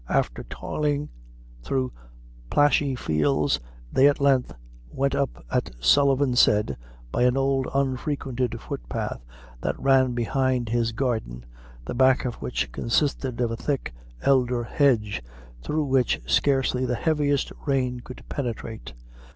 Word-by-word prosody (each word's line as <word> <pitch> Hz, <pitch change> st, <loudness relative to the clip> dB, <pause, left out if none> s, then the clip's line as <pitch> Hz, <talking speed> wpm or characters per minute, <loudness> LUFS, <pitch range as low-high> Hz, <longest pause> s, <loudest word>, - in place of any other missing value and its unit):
After -, -, 0 dB
toiling 150 Hz, -1 st, -2 dB, 0.5 s
thro' 130 Hz, -, -1 dB, 0.6 s
plashy 145 Hz, -, +3 dB
fields, 75 Hz, -, +1 dB, 0.3 s
they 135 Hz, -, +6 dB
at 145 Hz, -, -1 dB
length 135 Hz, -3 st, +3 dB, 0.4 s
went 135 Hz, -, 0 dB
up, 140 Hz, -1 st, -2 dB
as 125 Hz, -, +3 dB, 0.2 s
Sullivan 140 Hz, -, +4 dB
had 125 Hz, -, +2 dB
said, 105 Hz, -, +3 dB, 0.3 s
by -, -, -1 dB
an 125 Hz, +1 st, +3 dB
old 135 Hz, -1 st, +1 dB
unfrequented 130 Hz, -2 st, -1 dB
footpath, -, -, -5 dB, 0.4 s
that -, -, -2 dB
ran 130 Hz, -2 st, +3 dB
behind 125 Hz, 0 st, 0 dB
his 115 Hz, 0 st, +1 dB
garden, 110 Hz, -, -2 dB, 0.4 s
the -, -, -4 dB
back 130 Hz, +1 st, +4 dB
of 125 Hz, -, -1 dB
which -, -, -2 dB
consisted 125 Hz, -, 0 dB
of 120 Hz, -2 st, +1 dB
a -, -, -2 dB
thick 135 Hz, -, -3 dB, 0.3 s
elder 125 Hz, -3 st, +2 dB
hedge, 115 Hz, -, +1 dB, 0.4 s
through 155 Hz, -, -1 dB
which 130 Hz, -2 st, +2 dB
scarcely 135 Hz, -2 st, +2 dB
the 125 Hz, -1 st, 0 dB
heaviest 145 Hz, 0 st, +1 dB, 0.2 s
rain 130 Hz, -3 st, 0 dB
could 125 Hz, +1 st, -11 dB
penetrate. 115 Hz, -, -5 dB
130 Hz, 130 wpm, -25 LUFS, 115-140 Hz, 0.6 s, they